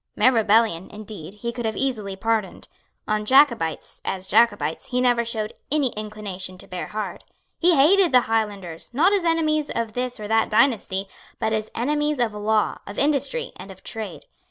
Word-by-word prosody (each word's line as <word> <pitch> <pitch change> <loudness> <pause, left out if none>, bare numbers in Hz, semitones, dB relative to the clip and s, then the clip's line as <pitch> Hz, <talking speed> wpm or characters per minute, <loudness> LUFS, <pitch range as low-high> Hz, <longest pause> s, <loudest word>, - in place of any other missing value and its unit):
Mere 255 - +5
rebellion, 220 -5 +2
indeed, 210 -4 -8
he 235 +3 -4
could 240 0 -5
have 220 - -2
easily 215 -8 -2
pardoned. 220 0 -2 0.4
On 215 0 0
Jacobites, 235 - +2
as 190 -1 -3
Jacobites, 205 -5 +2
he 250 - -1
never 245 -1 +3
showed 220 -2 -2 0.2
any 290 -3 +3
inclination 205 -4 -6
to - - -13
bear 180 -1 -5
hard. 210 -4 -5 0.4
He 350 0 +5
hated 345 +6 +5
the 250 -1 +6
Highlanders, 205 -8 -3
not 350 +9 +4
as 395 -3 +2
enemies 310 -3 +1
of 230 -2 -3
this 250 0 -3
or 210 - -5
that 225 +1 +2
dynasty, 215 -4 +2 0.3
but 220 - -1
as 215 0 -2
enemies 295 +4 0
of 235 -4 0
law, 210 0 0
of 205 - -8
industry 300 - 0
and - - -10
of 190 -1 -12
trade. 220 -2 -6
225 Hz, 175 wpm, -23 LUFS, 210-260 Hz, 0.4 s, the